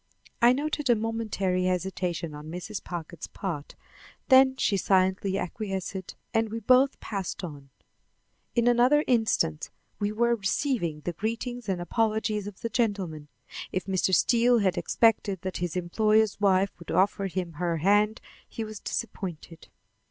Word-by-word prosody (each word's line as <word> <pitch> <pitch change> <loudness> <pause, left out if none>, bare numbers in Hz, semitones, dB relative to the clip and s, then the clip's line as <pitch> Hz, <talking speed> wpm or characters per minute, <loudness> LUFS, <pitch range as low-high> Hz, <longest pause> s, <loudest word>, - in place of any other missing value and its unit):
I 240 +1 +7
noted 290 +1 -1
a 240 - +6
momentary 215 -5 -1
hesitation 180 -3 -2
on 150 +1 -9
Mrs. 180 +5 -6
Packard's 170 -2 -6
part, 170 -8 -5 0.5
then 265 0 +7
she 210 - +1
silently 190 0 +2
acquiesced 190 -1 -4 0.2
and 225 -1 +1
we 225 +2 -4
both 255 +4 +4
passed 195 -3 -5
on. 145 -5 -8 0.9
In 235 0 +3
another 250 +5 +4
instant 220 - +1 0.3
we 205 0 0
were 235 +2 +2
receiving 200 - -1
the 175 - -3
greetings 230 +4 -4
and 185 -2 0
apologies 215 +1 0
of 205 -2 -10
the 230 - -2
gentlemen. 195 -11 -1 0.4
If 185 - -2
Mr. 190 0 0
Steele 235 +6 +4
had 190 -4 +2
expected 205 -5 +1
that 185 -1 -3
his 175 -1 -3
employer's 215 +4 +2
wife 195 -1 +3
would 170 - -12
offer 195 +1 +2
him 180 -2 -3
her 170 -1 0
hand, 205 +6 +2 0.3
he 225 - -5
was 215 -1 -7
disappointed. 175 -7 -5
200 Hz, 145 wpm, -27 LUFS, 180-225 Hz, 0.9 s, I